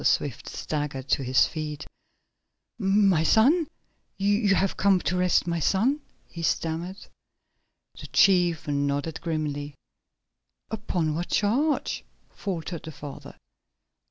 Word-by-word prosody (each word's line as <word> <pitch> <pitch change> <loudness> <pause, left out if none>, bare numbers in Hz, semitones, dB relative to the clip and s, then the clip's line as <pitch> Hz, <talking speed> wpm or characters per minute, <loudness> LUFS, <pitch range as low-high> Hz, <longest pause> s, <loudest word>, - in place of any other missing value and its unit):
Swift - - 0
staggered 145 -3 -4
to 135 - +2
his 130 0 +4
feet. 150 -2 -5 0.9
"My 195 -4 +3
son! 275 - +4 0.5
You 205 0 +2
have 195 +1 +1
come 195 -1 +3
to 180 +2 -1
arrest 180 -1 +3
my 170 -1 -1
son?" 235 - +2 0.3
he 170 - -8
stammered. 165 +3 -1 1.0
The - - -8
chief 175 -5 +3
nodded 145 +2 -1
grimly. 150 -3 -3 1.0
"Upon 180 -8 -1
what 170 +3 -3
charge?" 265 +9 +1 0.3
faltered 175 -3 -5
the 160 - -8
father. 145 -2 -9
170 Hz, 110 wpm, -26 LUFS, 150-195 Hz, 1.0 s, his